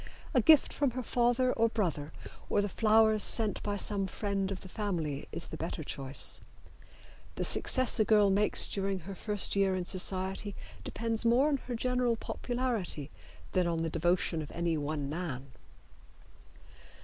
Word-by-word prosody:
A 255 - +4
gift 305 +5 +5
from 285 -2 +1
her 255 - -2
father 245 +2 +1
or 230 0 +2
brother 165 -9 -2 0.4
or - - +2
the - - -1
flowers 220 +1 +3
sent 215 -2 +2
by 205 -1 -2
some 200 -1 +1
friend 195 0 -2
of 190 - -5
the - - -10
family 175 -9 -3
is - - -5
the - - -7
better - - -4
choice. 135 0 +1 1.0
The - - -2
success 255 -4 +3
a - - +5
girl 210 -2 +4
makes 205 +2 +1
during 195 -1 -2
her 195 +4 -8
first 205 +1 0
year 195 -1 +2
in 180 -1 -3
society 190 +2 -1 0.3
depends 225 -1 -3
more 245 +5 +4
on 285 - +1
her 250 -2 -6
general 250 0 0
popularity 230 - -3 0.4
than 180 -2 +1
on 165 -1 -1
the 165 - -2
devotion 170 0 0
of 150 - -8
any 170 -1 0
one 145 -1 -3
man. 140 -4 -5
200 Hz, 160 wpm, -31 LUFS, 175-230 Hz, 1.0 s, gift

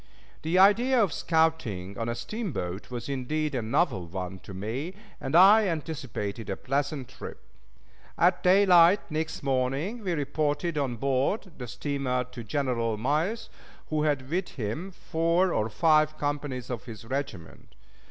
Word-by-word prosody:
The 165 +3 0
idea 235 +7 +5
of 200 -9 +2
scouting 160 - 0
on 115 +2 -3
a 115 - -2
steamboat 115 - -4
was 120 -2 -5
indeed 145 +3 -2
a 125 - 0
novel 115 - 0
one 95 +1 -5
to - - -12
me, 115 - -4 0.2
and 135 +3 -2
I 200 +4 +8
anticipated 135 - -4
a 95 - -2
pleasant 140 0 -2
trip. - - -9 0.8
At 175 +1 +3
daylight 185 0 +6
next 160 +1 -3
morning 135 - -1
we 180 -3 -1
reported 150 +2 -1
on 135 -5 -1
board 135 - 0
the 125 - -5
steamer 125 +1 -2
to 120 - -7
General 115 -1 -1
Miles, 155 - 0 0.4
who 155 -1 +1
had 145 -4 0
with 180 +5 -1
him 125 - -3
four 170 0 +1
or 110 +1 0
five 155 +6 +3
companies 145 -4 -3
of 125 0 -5
his 115 -2 -9
regiment. 120 -10 -6
145 Hz, 145 wpm, -28 LUFS, 120-170 Hz, 0.8 s, I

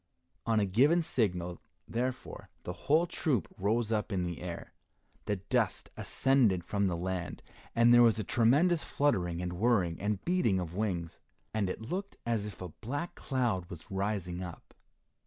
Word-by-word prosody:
On 110 -1 +3
a 105 - +3
given 140 - +4
signal, 90 - -1 0.3
therefore, 125 +2 -4
the 90 - -4
whole 155 - +2
troop 145 - 0
rose 110 +3 0
up 110 0 0
in 95 -2 0
the 85 -1 -5
air. 90 -1 -6 0.5
The 105 - 0
dust 95 0 -1
ascended 120 -10 +2
from 100 +2 0
the 85 -2 -1
land, 90 0 -4 0.3
and 115 +1 +6
there 120 - +8
was 115 -2 +5
tremendous 150 +9 +3
fluttering 90 -12 0
and 90 0 -3
whirring 90 -5 +1
and 105 -1 -1
beating 170 - +2
of 85 -2 -4
wings, 90 -5 -2 0.3
and 105 -3 0
it 90 - -4
looked 185 - -4
as 115 -3 0
if 95 -3 -8
a 90 - -5
black 145 - -5
cloud 120 - -1
was 85 -1 -10
rising 95 -2 -2
up. 90 -3 -9
105 Hz, 160 wpm, -31 LUFS, 90-120 Hz, 0.5 s, there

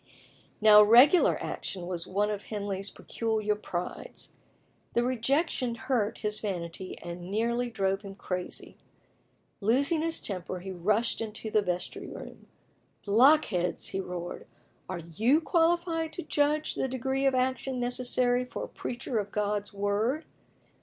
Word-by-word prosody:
Now, 210 -1 +9
"regular 245 - +7
action" 180 -3 -5
was 175 -1 -3
one 205 +3 0
of 205 -1 -5
Henley's 200 -2 -3
peculiar 220 -2 -1
prides. 180 -4 -6 0.6
The 235 - +3
rejection 255 +1 0
hurt 225 -2 -1
his 210 -1 -1
vanity 185 -2 -5
and 175 +1 -7
nearly 235 +4 0
drove 195 -3 0
him 195 -2 -9
crazy. 180 -2 -5 0.8
Losing 275 +9 +2
his 330 0 0
temper, 185 -2 -3
he 190 +1 -6
rushed 210 +7 0
into 220 0 -5
the 215 - +4
vestry 180 -2 -3
room. - - -10 0.6
"Blockheads!" 215 - +3
he 190 - -3
roared, 180 -2 -6 0.4
"are 185 - -3 0.2
you 265 +7 +5
qualified 330 -1 +1
to 350 - -4
judge 300 +1 +1
of - - -2
the - - +1
degree 265 +2 0
of 265 - +2
action 260 0 0
necessary 245 0 +1
for 250 - -6
a - - -4
preacher 240 -1 -3
of 205 -1 -3
God's 205 0 -1
Word? 205 +9 0
220 Hz, 140 wpm, -29 LUFS, 195-260 Hz, 0.8 s, Now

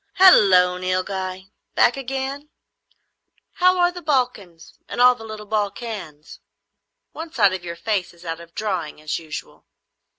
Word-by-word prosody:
"Halloo, 190 - +6
Nilghai. 185 +1 -3 0.2
Back - - +4
again? 270 +2 -4 1.0
How 365 -1 +3
are 350 0 +3
the 355 0 -9
Balkans 245 - -2
and - - -5
all 250 0 +7
the 235 -2 -12
little 215 -1 -8
Balkans? 205 -7 -4 0.7
One 325 0 -8
side 205 -9 +3
of 185 -1 -5
your 170 -1 -6
face 200 -1 -2
is 170 0 -18
out 165 0 -4
of 170 0 -14
drawing, 185 -9 -3
as 155 0 -3
usual." 155 -2 -9
205 Hz, 140 wpm, -22 LUFS, 180-260 Hz, 1.0 s, all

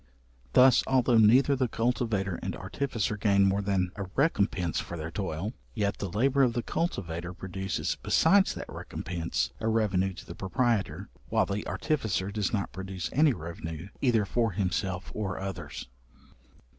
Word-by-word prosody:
Thus, 130 -1 +7
although 125 -3 +4
neither 125 +6 +6
the 130 -1 +1
cultivator 115 -5 -1
and - - -3
artificer 115 -7 -2
gain 100 -2 +4
more 100 +1 +2
than 95 -3 0
a 100 - -4
recompence 100 - +1
for 85 - -5
their 80 0 -5
toil; 95 +3 -3 0.2
yet 100 -2 -1
the 100 - -3
labour 135 +9 +2
of 125 -3 +4
the 120 0 -2
cultivator 90 - -3
produces 95 0 -3
besides 190 +4 +4
that - - -5
recompense, 85 -8 -3
a 110 - -2
revenue 100 -4 +1
to - - -11
the - - -8
proprietor, 95 - -1 0.2
while 110 -2 +3
the 100 +2 -3
artificer 110 -10 -1
does 105 -1 -1
not 100 -4 -1
produce 95 -3 -5
any 150 +1 +5
revenue 80 -1 -7
either 115 -6 +3
for 115 +1 0
himself 95 0 -2
or 100 -4 -3
others. 90 -7 -6
100 Hz, 155 wpm, -29 LUFS, 90-115 Hz, 0.2 s, Thus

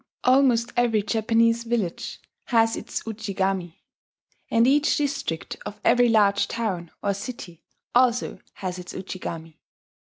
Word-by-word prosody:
Almost 250 -2 +4
every 235 -4 +2
Japanese 230 +2 +2
village 230 -7 -2 0.3
has 225 -2 +3
its - - -5
Ujigami; 195 -5 -3 0.7
and 230 0 +4
each 290 +3 +3
district 275 - -2
of 210 - -7
every 245 0 +5
large 205 -3 +3
town 190 -8 -3
or 200 - +1
city 195 -5 -8 0.3
also 245 -1 +2
has 185 -1 -5
its 180 0 -8
Ujigami. 165 -4 -7
225 Hz, 120 wpm, -25 LUFS, 190-235 Hz, 0.7 s, every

